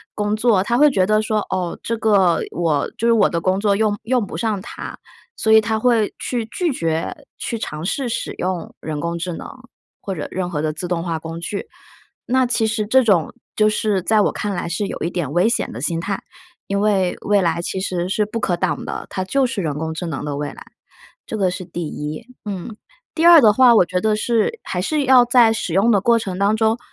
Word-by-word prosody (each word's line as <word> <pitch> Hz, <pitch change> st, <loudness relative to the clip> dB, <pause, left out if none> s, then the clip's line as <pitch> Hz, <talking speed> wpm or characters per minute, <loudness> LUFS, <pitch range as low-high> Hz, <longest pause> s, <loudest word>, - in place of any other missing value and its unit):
工 210 Hz, 0 st, 0 dB
作， 215 Hz, -4 st, +3 dB
他 240 Hz, +4 st, 0 dB
会 300 Hz, 0 st, +7 dB
觉 190 Hz, -9 st, +2 dB
得 215 Hz, +2 st, +2 dB
说， 215 Hz, -1 st, 0 dB
哦， 180 Hz, -2 st, -2 dB
这 230 Hz, -, -1 dB
个 200 Hz, -6 st, +3 dB
我 160 Hz, -5 st, 0 dB
就 230 Hz, -, 0 dB
是 -, -, +5 dB
我 215 Hz, -3 st, +4 dB
的 170 Hz, -, -1 dB
工 185 Hz, +3 st, 0 dB
作 200 Hz, -1 st, +2 dB
用 210 Hz, 0 st, 0 dB
用 240 Hz, -1 st, +1 dB
不 -, -, -8 dB
上 220 Hz, -4 st, -1 dB
它。 -, -, -8 dB, 0.4 s
所 220 Hz, -, +2 dB
以 220 Hz, -, +8 dB
他 220 Hz, +1 st, -1 dB
会 225 Hz, -2 st, +2 dB
去 240 Hz, -2 st, -2 dB
拒 345 Hz, +5 st, -1 dB
绝 165 Hz, -5 st, -2 dB, 0.2 s
去 230 Hz, -2 st, -4 dB
尝 155 Hz, -5 st, -5 dB
试 250 Hz, +4 st, -2 dB
使 -, -, -3 dB
用 180 Hz, -2 st, -4 dB
人 155 Hz, -2 st, -4 dB
工 170 Hz, +1 st, -3 dB
智 175 Hz, +1 st, -4 dB
能 -, -, -7 dB, 0.5 s
或 195 Hz, -, -5 dB
者 155 Hz, -5 st, -5 dB
任 185 Hz, -1 st, -3 dB
何 150 Hz, -3 st, -2 dB
的 155 Hz, -1 st, 0 dB
自 175 Hz, +4 st, -5 dB
动 170 Hz, -1 st, -1 dB
化 170 Hz, -2 st, -2 dB
工 165 Hz, +1 st, -7 dB
具， 200 Hz, +4 st, -5 dB, 0.6 s
那 260 Hz, +1 st, +3 dB
其 230 Hz, -2 st, +1 dB
实 215 Hz, -1 st, -1 dB
这 260 Hz, +4 st, +4 dB
种， 195 Hz, -8 st, +2 dB, 0.2 s
就 215 Hz, -, +4 dB
是 210 Hz, -3 st, 0 dB
在 215 Hz, +2 st, +3 dB
我 -, -, +2 dB
看 205 Hz, -1 st, -3 dB
来 175 Hz, -2 st, -3 dB
是 185 Hz, +5 st, -2 dB
有 -, -, -6 dB
一 170 Hz, -, 0 dB
点 170 Hz, -7 st, -3 dB
危 185 Hz, +6 st, +3 dB
险 235 Hz, -, -1 dB
的 115 Hz, -, -7 dB
心 165 Hz, +3 st, -1 dB
态， 195 Hz, +3 st, -3 dB, 0.5 s
因 200 Hz, 0 st, -1 dB
为 195 Hz, -4 st, +1 dB
未 205 Hz, -1 st, +2 dB
来 170 Hz, -2 st, 0 dB
其 190 Hz, -, -3 dB
实 180 Hz, -2 st, -2 dB
是 210 Hz, +2 st, +1 dB
不 220 Hz, +2 st, -4 dB
可 180 Hz, -5 st, 0 dB
挡 175 Hz, -, -2 dB
的。 -, -, -5 dB
它 185 Hz, -, -3 dB
就 270 Hz, +7 st, +1 dB
是 220 Hz, -6 st, -3 dB
人 150 Hz, -2 st, -2 dB
工 160 Hz, 0 st, -3 dB
智 175 Hz, -, -4 dB
能 155 Hz, -4 st, -4 dB
的 145 Hz, -1 st, -3 dB
未 145 Hz, 0 st, -3 dB
来。 -, -, -11 dB, 0.6 s
这 220 Hz, -, -5 dB
个 190 Hz, -2 st, +2 dB
是 185 Hz, 0 st, -6 dB
第 175 Hz, 0 st, -6 dB
一， 150 Hz, +4 st, -5 dB, 0.2 s
嗯。 200 Hz, +2 st, -5 dB, 0.4 s
第 325 Hz, -, +1 dB
二 340 Hz, -2 st, +9 dB
的 220 Hz, -4 st, +7 dB
话， 245 Hz, +2 st, +6 dB
我 185 Hz, -, +5 dB
觉 180 Hz, +1 st, -1 dB
得 215 Hz, +1 st, +2 dB
是 235 Hz, -, 0 dB
还 180 Hz, -, -3 dB
是 300 Hz, +9 st, 0 dB
要 255 Hz, -2 st, +6 dB
在 240 Hz, -2 st, +5 dB
使 225 Hz, -, -3 dB
用 220 Hz, +5 st, +4 dB
的 205 Hz, -, +4 dB
过 235 Hz, +3 st, +4 dB
程 190 Hz, -4 st, -5 dB
当 200 Hz, +2 st, +3 dB
中 220 Hz, +1 st, +2 dB
200 Hz, 255 characters per minute, -20 LUFS, 175-225 Hz, 0.6 s, 二